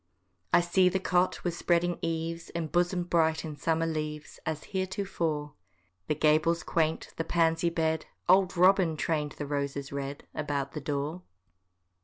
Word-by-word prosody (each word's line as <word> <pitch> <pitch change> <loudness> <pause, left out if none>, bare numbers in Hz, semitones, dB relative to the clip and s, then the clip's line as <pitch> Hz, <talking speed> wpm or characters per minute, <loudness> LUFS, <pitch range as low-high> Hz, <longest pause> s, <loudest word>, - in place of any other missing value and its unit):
I 175 - +6
see 180 +1 +3
the 190 - 0
cot 180 -1 +1
with 175 - -1
spreading 175 0 +1
eaves 165 0 -3
Embosom'd 175 +2 0
bright 160 -3 +2
in 155 -2 -5
summer 165 +2 0
leaves, 155 -2 -4
As 155 -1 -2
heretofore: 180 -6 -2 0.5
The 150 - +1
gables 155 +2 +3
quaint, 160 -1 0
the 165 - 0
pansy 165 0 +2
bed,— 160 -1 -1 0.2
Old 185 0 +4
Robin 180 -3 +4
train'd 150 -3 -1
the 145 - -5
roses 140 -1 -3
red 140 0 -5
About 140 -2 -2
the 150 - -5
door. 145 +5 -3
165 Hz, 145 wpm, -29 LUFS, 150-175 Hz, 0.5 s, I